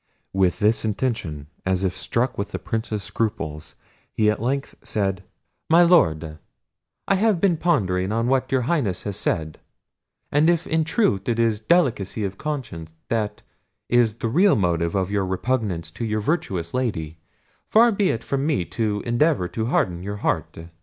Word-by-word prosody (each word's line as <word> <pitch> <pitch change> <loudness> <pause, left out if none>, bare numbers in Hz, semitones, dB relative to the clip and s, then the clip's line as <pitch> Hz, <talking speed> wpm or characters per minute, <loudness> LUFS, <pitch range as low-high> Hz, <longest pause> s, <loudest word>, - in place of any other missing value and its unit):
With 95 -2 +2
this 105 +2 +2
intention, 105 - -2 0.2
as 95 0 0
if 90 -1 0
struck 120 +6 -1
with 100 - -3
the - - -4
Prince's 110 -2 -3
scruples, 80 -8 -3 0.4
he 105 -1 +2
at 105 - -4
length 135 +4 -1
said: 100 -6 -1 0.5
"My 170 +2 +7
Lord, 80 - +3 0.7
I - - +3
have 200 -1 +2
been 185 -1 +3
pondering 95 - +1
on 115 +1 0
what 130 +1 +1
your 130 -1 +2
Highness 120 - 0
has 100 -2 -3
said; 80 -3 -2 0.7
and 150 +3 +4
if 170 -1 +2
in 160 -1 +1
truth 150 - +1
it 115 - +1
is 115 -2 +2
delicacy 115 - +1
of 95 -1 -4
conscience 110 - -5
that 105 -2 -2 0.5
is 120 -3 +3
the 115 - -3
real 180 - +4
motive 85 -3 0
of 95 0 0
your 100 -1 +1
repugnance 95 -4 -2
to 115 - -6
your 110 -1 -1
virtuous 100 - -2
Lady, 85 -11 -2 0.5
far 230 +2 +5
be 200 -2 +1
it 115 - -2
from 135 0 -1
me 145 - 0
to 105 -1 -2
endeavour 120 - +2
to 110 0 -3
harden 90 -8 0
your 100 +2 -5
heart. - - -2
110 Hz, 165 wpm, -23 LUFS, 95-135 Hz, 0.7 s, My